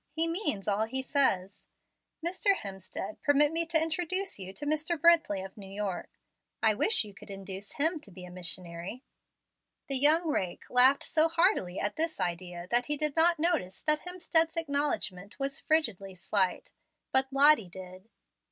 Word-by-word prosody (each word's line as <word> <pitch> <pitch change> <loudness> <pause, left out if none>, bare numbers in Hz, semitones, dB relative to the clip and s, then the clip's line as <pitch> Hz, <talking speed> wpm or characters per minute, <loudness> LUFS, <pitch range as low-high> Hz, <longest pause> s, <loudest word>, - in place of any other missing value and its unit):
He 325 +1 0
means 330 - -1
all 210 +1 +1
he 260 +4 -2
says. 205 -9 0 0.6
Mr. 375 +3 +1
Hemstead, 195 - -8
permit 290 +1 +4
me 330 0 +1
to 325 -1 +2
introduce 355 +4 -2
to - - -9
you 190 0 -7
Mr. 310 - -2
Brently 315 - +3
of 195 - -12
New 195 -2 -11
York. 195 -2 -4 0.5
I 220 -1 +4
wish 420 - +2
you 210 -2 -12
could 200 - -14
induce 195 0 -7
him 320 +3 +1
to 290 - -16
be 180 -1 -11
a 180 - -12
missionary." 175 - -5 0.9
The 275 - +3
young 315 +5 +4
rake 185 - -3
laughed 255 +3 +5
so 315 0 +3
heartily 330 - +1
at 205 - -3
this 320 0 -1
idea 175 0 -4
that 240 +1 +1
he 295 - +1
did 300 -1 +1
not 335 +1 +4
notice 305 - -2
that 305 -1 +2
Hemstead's 340 -2 0
acknowledgment 280 - -2
was 275 0 -3
frigidly 215 - -1
slight; 185 +1 -1 0.4
but 265 0 +1
Lottie 275 -7 +6
did. 185 +3 -12
265 Hz, 165 wpm, -29 LUFS, 195-320 Hz, 0.9 s, Lottie